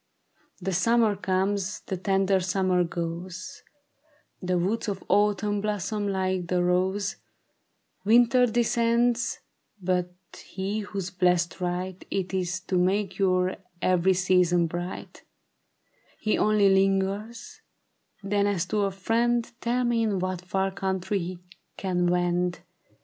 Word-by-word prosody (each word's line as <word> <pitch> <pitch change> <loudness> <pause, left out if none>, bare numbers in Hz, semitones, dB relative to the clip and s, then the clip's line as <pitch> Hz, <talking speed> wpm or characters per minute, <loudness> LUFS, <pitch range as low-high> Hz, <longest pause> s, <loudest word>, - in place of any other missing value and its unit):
The 190 0 -3
summer 225 +3 +3
comes; 195 +1 -1
the 190 - -4
tender 195 +1 +2
summer 185 -1 +1
goes; 175 +7 -5 0.8
The 180 -1 0
woods 195 +7 -1
of 195 -2 -3
Autumn 205 +1 +2
blossom 210 0 -2
like 185 -2 -1
the 180 0 +1
rose; 185 +3 0 0.9
Winter 240 +3 +5
descends; 235 0 +1 0.4
but 180 -1 0 0.3
he 195 +3 -3
whose 200 -3 -5
blessed 180 -1 +1
right 180 +1 -3
It 190 -1 -2
is 185 0 -1
to 185 -1 -1
make 195 +2 0
your 185 -1 +2 0.2
every 185 +1 +3
season 180 -2 +3
bright, 175 +2 -6 1.0
He 215 - +1
only 210 -1 +3
lingers; 195 - 0 0.6
then 200 +1 +1
as 190 -4 0
to 205 -1 +2
a - - +1
friend 230 +5 0
Tell 245 +2 0
me 240 -1 +1
in 215 -3 +1
what 185 -1 -2
far 190 +1 -1
country 190 +1 -2
he 180 0 -5 0.4
can 180 -2 0
wend. 175 0 0
190 Hz, 120 wpm, -26 LUFS, 180-210 Hz, 1.0 s, Winter